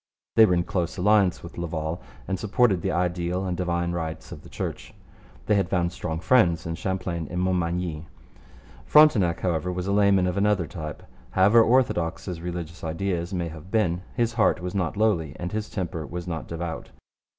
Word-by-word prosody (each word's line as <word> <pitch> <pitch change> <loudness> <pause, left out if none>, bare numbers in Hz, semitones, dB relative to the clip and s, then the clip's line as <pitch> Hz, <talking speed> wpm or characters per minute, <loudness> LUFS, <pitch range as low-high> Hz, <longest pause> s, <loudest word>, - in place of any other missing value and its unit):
They 110 -1 +8
were 90 - +3
in 85 - +1
close 85 -1 -2
alliance 100 -1 +3
with 85 +1 -9
Laval 80 -1 -3 0.3
and 95 -1 -2
supported 105 -3 +2
the - - -1
ideal 90 +1 -1
and 90 -1 -2
divine 85 -1 -1
rights 80 -2 -5
of - - -8
the - - -14
Church. - - -6 0.5
They 105 - +2
had 100 -3 +1
found 85 -2 +1
strong 80 -2 -4
friends 90 -5 +3
in 85 - -3
Champlain 90 -2 -3
and 90 - -3
Montmagny. 90 -3 -1 0.8
Frontenac, 110 - +5
however, 90 -1 0
was 90 0 -3
a 100 - -1
layman 100 -2 +4
of 90 +1 -1
another 100 -3 +2
type. 75 -2 -7 0.3
However 100 - +5
orthodox 110 -8 +2
his 90 -4 -5
religious 85 -1 -6
ideas 85 +2 -2
may 85 -3 -2
have 80 +2 -11
been, 95 -5 +1
his 120 -1 +1
heart 115 -5 +3
was 90 0 -5
not 95 -1 -1
lowly 90 -10 +1
and 90 0 -4
his 105 0 -3
temper 85 -4 -4
was 90 0 -6
not 80 -2 -4
devout. 85 0 -5
90 Hz, 185 wpm, -25 LUFS, 85-100 Hz, 0.8 s, They